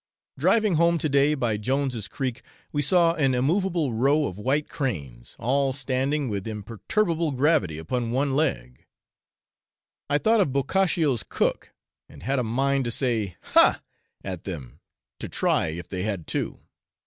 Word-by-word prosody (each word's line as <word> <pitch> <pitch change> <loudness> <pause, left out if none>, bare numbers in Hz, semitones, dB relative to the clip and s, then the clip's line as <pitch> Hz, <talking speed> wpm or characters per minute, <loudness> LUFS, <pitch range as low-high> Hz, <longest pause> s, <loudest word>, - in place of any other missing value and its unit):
Driving 215 -7 +3
home 170 +1 +4
to 160 - -1
day 140 +1 +3
by 120 -6 0
Jones' 125 -1 -1
Creek, 130 -1 -4 0.3
we 145 - 0
saw 170 +2 +4
an 135 -6 +1
immovable 165 - +1
row 140 +6 +2
of 95 -4 -5
white 140 +7 0
cranes, 70 - -5
all 135 +2 +1
standing 135 +2 -1
with 100 -2 -3
imperturbable 150 - -1
gravity 125 - +2
upon 115 +9 -2
one 135 +3 0
leg. 95 - -1 1.3
I 145 - +3
thought 220 +7 +3
of 145 - +1
Boccaccio's 145 - +1
cook, - - -1 0.3
and 75 0 -14
had 135 +5 0
a - - 0
mind 135 +4 +1
to - - -1
say, 115 -7 -1 0.2
Ha! - - +5 0.4
at 95 -3 -5
them 75 -10 -7 0.4
to - - -5
try - - +1
if 80 +2 -6
they 90 0 -4
had 100 -5 -3
two. - - -3
135 Hz, 150 wpm, -25 LUFS, 105-150 Hz, 1.3 s, Ha